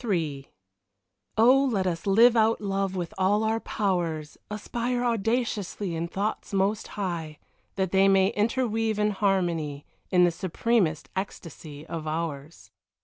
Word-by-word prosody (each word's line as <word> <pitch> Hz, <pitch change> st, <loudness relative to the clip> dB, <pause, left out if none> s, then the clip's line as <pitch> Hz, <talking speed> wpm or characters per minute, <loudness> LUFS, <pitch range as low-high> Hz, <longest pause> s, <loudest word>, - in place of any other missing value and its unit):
XXIII 160 Hz, -, -2 dB, 0.9 s
Oh, 255 Hz, +5 st, +6 dB
let 195 Hz, -4 st, 0 dB
us 170 Hz, 0 st, -2 dB
live 230 Hz, +5 st, +6 dB
out 225 Hz, 0 st, +3 dB
love 195 Hz, -2 st, -2 dB
with 180 Hz, +2 st, -4 dB
all 205 Hz, +3 st, +3 dB
our 220 Hz, +1 st, +1 dB
powers, 170 Hz, -9 st, -2 dB
Aspire 240 Hz, +4 st, -2 dB
audaciously 225 Hz, -5 st, -1 dB
in 165 Hz, +1 st, -2 dB
thoughts 205 Hz, +4 st, -3 dB
most 200 Hz, +2 st, +1 dB
high, 170 Hz, -6 st, -3 dB, 0.4 s
That 190 Hz, -2 st, -1 dB
they 195 Hz, 0 st, +4 dB
may 195 Hz, 0 st, +4 dB
interweave 225 Hz, -1 st, 0 dB
in 210 Hz, 0 st, +2 dB
harmony 175 Hz, -8 st, 0 dB, 0.2 s
In 180 Hz, -1 st, +4 dB
the 175 Hz, -, +4 dB
supremest 185 Hz, -1 st, 0 dB
ecstasy 160 Hz, -5 st, -7 dB
of 165 Hz, -2 st, -6 dB
ours. 155 Hz, -1 st, -5 dB
195 Hz, 135 wpm, -26 LUFS, 165-220 Hz, 0.9 s, Oh